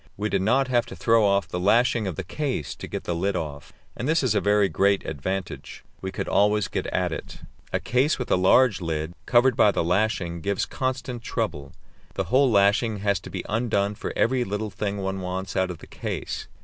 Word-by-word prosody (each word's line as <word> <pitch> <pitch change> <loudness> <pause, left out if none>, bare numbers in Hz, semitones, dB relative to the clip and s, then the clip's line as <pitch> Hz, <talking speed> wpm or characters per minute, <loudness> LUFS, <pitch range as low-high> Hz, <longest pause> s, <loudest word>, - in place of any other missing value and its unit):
We 105 +1 -1
did 100 -2 +1
not 125 +7 +2
have 120 -2 +1
to - - -8
throw 115 -1 +3
off 100 -3 +2
the 90 - -4
lashing 115 +3 +3
of 90 - -3
the 95 - -4
case 130 - -3
to - - -8
get - - -5
the 85 - -2
lid 95 +3 -1
off, 75 -4 -5 0.2
and 130 - -3
this 160 -2 +2
is 125 -5 +2
a 105 - +2
very 105 -1 +3
great 100 +1 +2
advantage; 90 +5 -5 0.2
we 95 - -4
could - - -4
always 105 0 +3
get - - -3
at - - -1
it. - - -7 0.3
A - - 0
case 130 +5 +1
with 125 - -4
a - - +6
large 100 +4 +4
lid, 80 -1 -3
covered 125 0 +4
by 115 - +5
the 100 - 0
lashing, 90 -2 0
gives 100 +2 0
constant 130 -2 -3
trouble; 85 - -3 0.4
the - - 0
whole 135 0 +5
lashing 105 +1 +3
has 100 -1 +1
to - - -10
be - - -5
undone 105 -3 0
for - - -5
every 125 +1 +2
little 105 0 -3
thing 100 0 -3
one 95 0 -3
wants 95 +1 -4
out 95 -1 +1
of 90 - -5
the - - -13
case. - - -5
100 Hz, 215 wpm, -25 LUFS, 95-120 Hz, 0.4 s, a